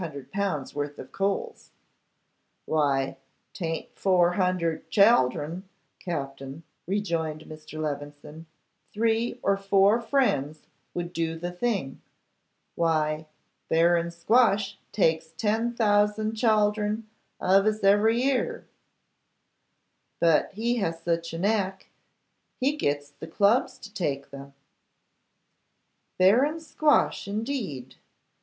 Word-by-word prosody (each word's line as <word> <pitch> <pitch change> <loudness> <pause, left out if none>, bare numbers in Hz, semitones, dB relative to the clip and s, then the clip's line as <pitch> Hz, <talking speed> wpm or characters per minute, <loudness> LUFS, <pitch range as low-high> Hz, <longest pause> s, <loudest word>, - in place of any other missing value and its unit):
worth 145 0 -4
of - - -10
coals.' 200 - -3 1.0
'Why, 140 -4 0 0.4
'tayn't 165 -3 -4
four 180 -3 +3
hundred 180 -3 -1
chaldron, 185 - +3 0.3
Captin,' 135 -2 -6 0.2
rejoined 165 -6 -2
Mr. 155 0 -10
Levison. 150 +1 -6 0.4
'Three 225 +2 0
or 200 - +2
four 195 +3 +3
friends 155 - 0 0.3
would 175 0 -4
do 165 0 -2
the 175 +2 -4
thing. 180 - -2 0.7
Why, 155 -2 0 0.4
Baron 170 +1 +3
Squash 200 +2 +2
takes 160 -4 +1
ten 225 +5 0
thousand 210 0 +2
chaldron 215 -1 +1 0.4
of 195 +2 +3
us 215 -1 0
every 215 +4 +4
year; 275 - -1 1.5
but 165 -2 +3
he 235 +4 -1
has 165 -6 -2
such 170 -1 -1
a 165 - -5
knack, 195 0 -1 0.7
he 275 +3 +1
gits 145 - -2
the 160 - -10
Clubs 210 +10 +2
to 210 -5 -12
take 140 -7 -3
them.' 140 0 -11 1.6
'Baron 255 - +4
Squash, 310 -6 +1
indeed! 205 - -4
185 Hz, 100 wpm, -26 LUFS, 160-215 Hz, 1.6 s, every